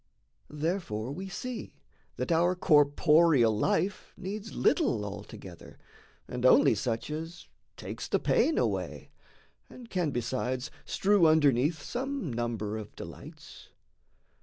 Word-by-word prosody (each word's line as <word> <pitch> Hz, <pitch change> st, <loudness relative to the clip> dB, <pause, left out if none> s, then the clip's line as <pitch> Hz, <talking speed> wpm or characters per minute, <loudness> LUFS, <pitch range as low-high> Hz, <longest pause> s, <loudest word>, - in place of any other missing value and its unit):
Therefore 150 Hz, -, -3 dB
we 190 Hz, +6 st, -6 dB
see 245 Hz, +4 st, -6 dB, 0.4 s
that -, -, -3 dB
our 175 Hz, +2 st, +3 dB
corporeal 150 Hz, -, +4 dB
life 180 Hz, -, -1 dB
Needs 205 Hz, +3 st, -6 dB
little, 115 Hz, -3 st, +2 dB
altogether, 100 Hz, 0 st, -10 dB, 0.5 s
and 125 Hz, 0 st, -5 dB
only 130 Hz, -, +6 dB
such 115 Hz, +5 st, -3 dB
As 165 Hz, +3 st, -6 dB, 0.3 s
takes -, -, -6 dB
the -, -, +2 dB
pain 320 Hz, -, +2 dB
away, -, -, -2 dB, 0.6 s
and 240 Hz, -3 st, -13 dB
can 180 Hz, -4 st, 0 dB
besides 130 Hz, 0 st, -2 dB
Strew 195 Hz, -4 st, +3 dB
underneath 150 Hz, -1 st, +3 dB
some 260 Hz, -, -3 dB
number 110 Hz, -2 st, -3 dB
of 105 Hz, -1 st, -10 dB
delights. -, -, -11 dB
150 Hz, 110 wpm, -29 LUFS, 120-185 Hz, 0.6 s, only